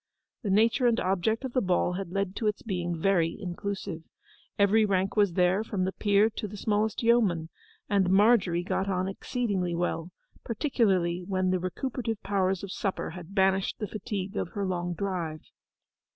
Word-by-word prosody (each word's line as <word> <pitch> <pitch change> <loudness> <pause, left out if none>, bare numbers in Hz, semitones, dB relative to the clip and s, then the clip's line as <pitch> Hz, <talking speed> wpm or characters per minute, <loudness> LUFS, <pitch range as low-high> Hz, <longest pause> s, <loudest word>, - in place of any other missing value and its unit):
The 210 - -3
nature 225 +5 +4
and 235 -1 +2
object 195 +7 0
of 255 - -5
the 255 - +2
ball 180 -2 +1
had 190 -1 -4
led 195 +1 -2
to 220 - 0
its 210 - -1
being 175 -5 -2
very 170 -2 +1
inclusive. 190 -1 -4 0.6
Every 205 +2 +4
rank 195 -2 +1
was 205 -4 +3
there, 180 +3 +2
from 205 -4 -2
the 190 - -1
peer 205 +1 +3
to 220 -1 -5
the 205 +1 -9
smallest 215 +2 0
yeoman, 205 -9 +3 0.4
and 195 -3 +2
Margery 195 -3 +4
got 190 +2 -1
on 185 -1 0
exceedingly 195 -4 -2
well, 170 -1 -2 0.3
particularly 195 - +1
when 185 -1 +1
the 185 - +1
recuperative 225 +4 -3
powers 190 -1 0
of 195 - -5
supper 195 -1 -2
had 180 +2 -10
banished 190 -1 +2
the 210 - -3
fatigue 200 0 -5
of - - -2
her 200 -1 -2
long 175 -1 -2
drive. 170 -5 -3
195 Hz, 170 wpm, -28 LUFS, 180-210 Hz, 0.6 s, nature